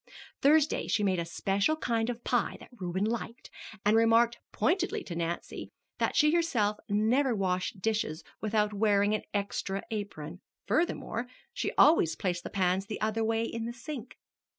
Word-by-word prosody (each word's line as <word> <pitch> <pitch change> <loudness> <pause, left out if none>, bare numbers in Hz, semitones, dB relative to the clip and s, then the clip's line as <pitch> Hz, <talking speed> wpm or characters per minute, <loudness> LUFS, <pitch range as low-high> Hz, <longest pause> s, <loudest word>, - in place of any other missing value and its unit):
Thursday 300 +1 +4
she 210 - +1
made 190 -3 +2
a 170 - -2
special 195 - 0
kind 230 -6 -1
of 240 0 -5
pie 245 -2 0
that - - -14
Reuben 190 -4 -2
liked, 230 +1 -4 0.3
and 210 +1 +5
remarked 230 +1 +4
pointedly 360 +2 0
to 170 - -6
Nancy 170 0 -4 0.3
that - - 0
she 300 0 +5
herself 235 -12 +1
never 230 +5 +2
washed 185 0 -1
dishes 210 -7 -1 0.2
without 210 -1 +1
wearing 205 0 +3
an 215 - 0
extra 200 -1 -2
apron; 180 -6 -5 0.2
furthermore, 245 -2 -1 0.3
she - - -2
always 170 - +5
placed 180 0 -2
the - - -5
pans 190 0 0
the 210 - -5
other 220 +1 0
way 225 0 +1
in 230 0 -3
the 235 - -4
sink. 260 -1 -8
215 Hz, 160 wpm, -30 LUFS, 195-235 Hz, 0.3 s, and